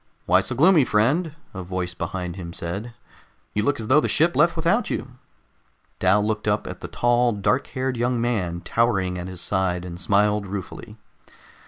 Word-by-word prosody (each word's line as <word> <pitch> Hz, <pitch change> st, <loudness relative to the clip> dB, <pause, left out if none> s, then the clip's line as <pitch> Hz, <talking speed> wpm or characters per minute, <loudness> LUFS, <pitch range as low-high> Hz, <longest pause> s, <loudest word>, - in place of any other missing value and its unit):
"Why 90 Hz, +2 st, +4 dB
so 120 Hz, -, -4 dB
gloomy, 160 Hz, +3 st, +5 dB
friend?" 140 Hz, +9 st, +1 dB, 0.2 s
a 95 Hz, -, -5 dB
voice 90 Hz, -1 st, -4 dB
behind 90 Hz, 0 st, -4 dB
him 85 Hz, -3 st, -7 dB
said. 100 Hz, +9 st, -5 dB, 0.6 s
"You 105 Hz, -, +1 dB
look 140 Hz, +5 st, 0 dB
as 110 Hz, -, -5 dB
though 130 Hz, +5 st, +5 dB
the -, -, 0 dB
ship 170 Hz, +3 st, +2 dB
left 170 Hz, +3 st, +4 dB
without 170 Hz, +9 st, +1 dB
you." 130 Hz, -, -4 dB, 0.9 s
Dal 105 Hz, +1 st, +3 dB
looked 105 Hz, 0 st, -2 dB
up 105 Hz, 0 st, +1 dB
at -, -, -7 dB
the -, -, -6 dB
tall, 120 Hz, 0 st, +2 dB
dark 105 Hz, +6 st, 0 dB
haired 130 Hz, -1 st, -3 dB
young 120 Hz, +1 st, 0 dB
man, 95 Hz, -8 st, -1 dB
towering 95 Hz, -3 st, 0 dB
at 90 Hz, -, -5 dB
his 90 Hz, -2 st, -6 dB
side, 90 Hz, -2 st, 0 dB
and 85 Hz, -1 st, -7 dB
smiled 105 Hz, +1 st, +2 dB
ruefully. 100 Hz, +3 st, -7 dB
105 Hz, 180 wpm, -23 LUFS, 95-125 Hz, 0.9 s, gloomy